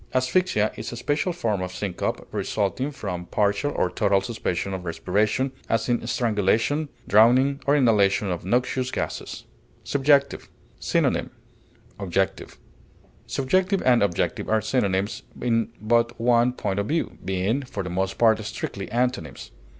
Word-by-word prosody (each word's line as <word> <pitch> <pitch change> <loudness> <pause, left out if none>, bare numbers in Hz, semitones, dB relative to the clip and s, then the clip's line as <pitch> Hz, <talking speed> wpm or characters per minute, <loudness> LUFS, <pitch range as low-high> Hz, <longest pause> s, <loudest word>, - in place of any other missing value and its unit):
Asphyxia 130 - +2
is 110 - -6
a - - -6
special 145 +9 -1
form 110 - -1
of 90 0 -4
syncope 90 -1 -3
resulting 110 +7 -1
from 90 -10 -5
partial 105 +7 +1
or 90 - 0
total 100 -2 +2
suspension 100 -4 -3
of 95 -1 -5
respiration, 105 +9 0 0.2
as 115 0 +1
in 120 -1 0
strangulation, 120 +5 +1 0.2
drowning, 130 +6 +4
or 140 - +5
inhalation 105 -7 +3
of 85 - -4
noxious 125 +5 0
gases. - - -5 0.4
SUBJECTIVE. 140 0 +2 0.3
Synonym: - - +1 0.7
objective. 95 0 -2 0.7
Subjective 185 +8 +1
and 125 -2 +5
objective 95 -4 0
are 110 - +3
synonyms 100 -4 0 0.2
in 115 -2 +1
but 115 +2 +1
one 120 +1 +3
point 100 -5 -2
of 100 - -1
view, 165 +5 -2
being, 95 +8 0
for 125 -7 -5
the 90 - -5
most 95 +1 -1
part, 110 -1 +4
strictly 100 -1 -5
antonyms. 120 - -2
110 Hz, 135 wpm, -24 LUFS, 100-130 Hz, 0.7 s, or